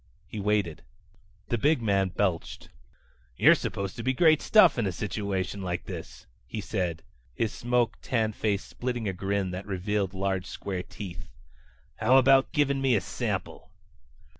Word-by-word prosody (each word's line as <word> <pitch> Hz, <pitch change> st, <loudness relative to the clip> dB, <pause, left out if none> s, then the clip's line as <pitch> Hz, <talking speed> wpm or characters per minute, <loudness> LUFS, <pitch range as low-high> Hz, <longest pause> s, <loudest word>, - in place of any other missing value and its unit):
He 110 Hz, -, -7 dB
waited. 100 Hz, -6 st, 0 dB, 0.7 s
The 120 Hz, -, 0 dB
big 150 Hz, +4 st, +3 dB
man 100 Hz, -4 st, +1 dB
belched. 90 Hz, -2 st, -2 dB, 0.7 s
"You're -, -, +7 dB
supposed 100 Hz, -1 st, -3 dB
to 115 Hz, -, -5 dB
be 130 Hz, +2 st, +1 dB
great 155 Hz, +2 st, +4 dB
stuff 185 Hz, -, +5 dB
in 110 Hz, -, +1 dB
a -, -, 0 dB
situation 100 Hz, 0 st, -3 dB
like 90 Hz, -1 st, -3 dB
this," -, -, -8 dB, 0.2 s
he 110 Hz, -, -5 dB
said, 90 Hz, -4 st, -2 dB, 0.3 s
his 115 Hz, -1 st, -1 dB
smoke 120 Hz, -1 st, 0 dB
tan 110 Hz, -4 st, 0 dB
face 100 Hz, -2 st, -1 dB
splitting 120 Hz, -2 st, -4 dB
in 100 Hz, -, 0 dB
a -, -, -9 dB
grin 95 Hz, 0 st, -1 dB
that 95 Hz, +2 st, -6 dB
revealed 100 Hz, 0 st, -1 dB
large 95 Hz, -1 st, -1 dB
square 95 Hz, -1 st, -4 dB
teeth. 90 Hz, -1 st, -9 dB, 0.7 s
"How 125 Hz, +4 st, +5 dB
about 135 Hz, +1 st, +5 dB
giving 140 Hz, -4 st, +1 dB
me 130 Hz, -3 st, +3 dB
a 100 Hz, -, +2 dB
sample?" -, -, -4 dB
100 Hz, 160 wpm, -28 LUFS, 95-120 Hz, 0.7 s, You're